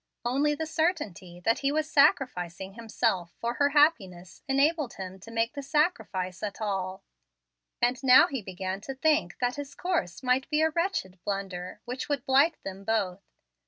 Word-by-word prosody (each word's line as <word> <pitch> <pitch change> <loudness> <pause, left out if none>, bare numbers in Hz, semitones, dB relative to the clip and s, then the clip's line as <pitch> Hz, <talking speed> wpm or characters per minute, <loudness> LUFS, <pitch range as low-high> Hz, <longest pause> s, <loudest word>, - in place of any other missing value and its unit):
Only 285 +5 +2
the 320 +2 -3
certainty 295 - -2
that 225 +5 +2
he 275 0 +1
was 310 +1 0
sacrificing 195 - +2
himself 220 -6 -1
for 235 +1 -1
her 285 - +5
happiness 205 - +1
enabled 285 0 +1
him 190 0 -7
to 225 - -12
make 230 0 0
the 285 - -5
sacrifice 270 - -1
at 205 -2 -4
all, 195 -2 -3 0.8
and 245 +1 +2
now 255 -1 +8
he 270 -4 -4
began 190 0 -5
to 270 +5 -6
think 310 +3 +1
that 245 +1 -1
his 285 -1 -7
course 330 - -2
might 255 +1 +1
be 305 0 +2
a 320 - +3
wretched 325 - -2
blunder 195 -3 -4
which 250 +4 -5
would 285 -2 -1
blight 280 +5 +4
them 195 0 -7
both. 195 -3 -1
240 Hz, 165 wpm, -28 LUFS, 190-290 Hz, 0.8 s, now